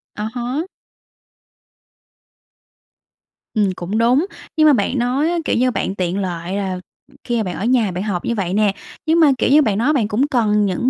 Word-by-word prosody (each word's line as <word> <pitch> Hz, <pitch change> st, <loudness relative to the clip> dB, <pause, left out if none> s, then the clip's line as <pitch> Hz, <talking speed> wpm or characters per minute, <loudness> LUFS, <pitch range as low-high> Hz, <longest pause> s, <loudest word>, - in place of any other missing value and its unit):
À 210 Hz, +1 st, -3 dB
há. 255 Hz, +8 st, -3 dB, 2.9 s
Ừm, 205 Hz, -4 st, +2 dB
cũng 185 Hz, +5 st, -3 dB
đúng. 250 Hz, +8 st, +3 dB, 0.3 s
Nhưng 310 Hz, 0 st, +5 dB
mà 295 Hz, -, +7 dB
bạn 245 Hz, +3 st, 0 dB
nói 265 Hz, +7 st, +1 dB
á, 345 Hz, -, 0 dB
kiểu -, -, +1 dB
như, 255 Hz, +1 st, +2 dB
bạn 195 Hz, -, -2 dB
tiện 185 Hz, +1 st, -1 dB
lợi 175 Hz, -1 st, -4 dB
là 190 Hz, -2 st, -2 dB, 0.4 s
khi 235 Hz, -3 st, -1 dB
bạn 180 Hz, -2 st, -4 dB
ở 210 Hz, -, -3 dB
nhà 235 Hz, -6 st, +2 dB
bạn 180 Hz, +3 st, -3 dB
học 195 Hz, -5 st, -3 dB
như 235 Hz, -, -1 dB
vậy 190 Hz, -3 st, -2 dB
nè, 205 Hz, -1 st, +2 dB, 0.3 s
nhưng 325 Hz, +2 st, +3 dB
mà, 300 Hz, -4 st, +6 dB
kiểu -, -, +1 dB
như, 300 Hz, +2 st, +6 dB
bạn 210 Hz, -7 st, +1 dB
nói 275 Hz, +7 st, +2 dB
bạn 230 Hz, -7 st, +1 dB
cũng 245 Hz, +7 st, +1 dB
cần 210 Hz, -6 st, +2 dB
những 200 Hz, +7 st, 0 dB
220 Hz, 195 wpm, -19 LUFS, 195-260 Hz, 2.9 s, mà